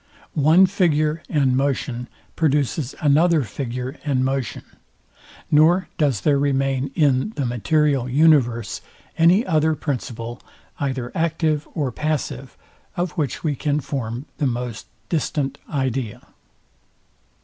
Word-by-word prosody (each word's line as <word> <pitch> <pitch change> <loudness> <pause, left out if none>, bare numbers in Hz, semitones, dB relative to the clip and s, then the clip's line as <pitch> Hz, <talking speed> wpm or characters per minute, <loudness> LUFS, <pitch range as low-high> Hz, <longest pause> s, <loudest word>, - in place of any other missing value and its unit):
One 160 +5 +5
figure 165 -5 +1
and 135 -5 +2
motion 130 -2 -1 0.3
produces 145 -2 0
another 155 +1 +4
figure 125 +4 -5
and 130 -3 +1
motion; 135 -2 -2 0.9
nor 165 +5 +4
does 140 -9 +2
there 145 -2 +3
remain 135 -1 0
in 145 +5 +2
the 140 - -1
material 135 +2 +1
universe 125 -7 +3 0.3
any 175 +7 +4
other 160 -2 +2
principle, 120 -5 -4 0.4
either 130 -3 -2
active 160 -2 0
or 145 -5 -1
passive, 140 -2 -3 0.4
of 175 -1 -1
which 150 -7 -3
we 150 -3 0
can 145 +2 0
form 130 -2 -4
the 145 - +2
most 120 -2 -4 0.2
distant 145 -3 -1
idea. 130 -6 -2
140 Hz, 115 wpm, -22 LUFS, 130-155 Hz, 0.9 s, One